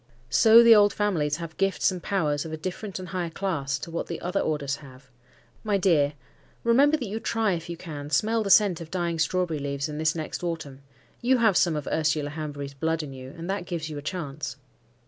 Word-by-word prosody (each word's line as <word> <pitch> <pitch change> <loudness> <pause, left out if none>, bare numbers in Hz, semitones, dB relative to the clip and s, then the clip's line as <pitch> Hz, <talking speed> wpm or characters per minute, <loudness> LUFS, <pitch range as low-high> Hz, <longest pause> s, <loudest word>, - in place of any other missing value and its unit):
So 225 +1 +7
the 235 -1 +9
old 205 -1 +5
families 165 -8 0
have 165 -2 -7
gifts 195 0 +2
and 180 -1 -6
powers 155 -7 0
of 160 - -7
a 160 - -4
different 185 +4 -5
and 185 -2 -7
higher 175 -1 -2
class 160 -7 -2
to 165 - -8
what 170 - -3
the 170 - -5
other 180 +3 -1
orders 145 -3 -1
have. 130 -2 -15 0.5
My 210 -2 +1
dear, 155 -7 +3 0.5
remember 275 +6 +4
that 260 - -4
you 215 +3 -4
try 225 -2 0
if 165 0 -5
you 170 - -5
can 145 -4 -7
smell 220 +10 +2
the 205 - -2
scent 195 -4 +5
of 160 - -8
dying 170 -2 -2
strawberry 165 -1 0
leaves 140 +1 -2
in 150 0 -6
this 160 +1 +1
next 160 +2 -5
autumn. 155 -6 -4 0.4
You 255 +2 +3
have 220 -5 +3
some 170 -3 +3
of 150 -2 -3
Ursula 150 -2 0
Hanbury's 145 -2 -6
blood 160 +3 -1
in 140 -2 -7
you, 130 0 -9
and 165 +1 -6
that 195 -3 -3
gives 160 -2 -4
you 150 - -5
a - - -8
chance." 155 -3 -5
165 Hz, 220 wpm, -26 LUFS, 150-195 Hz, 0.5 s, the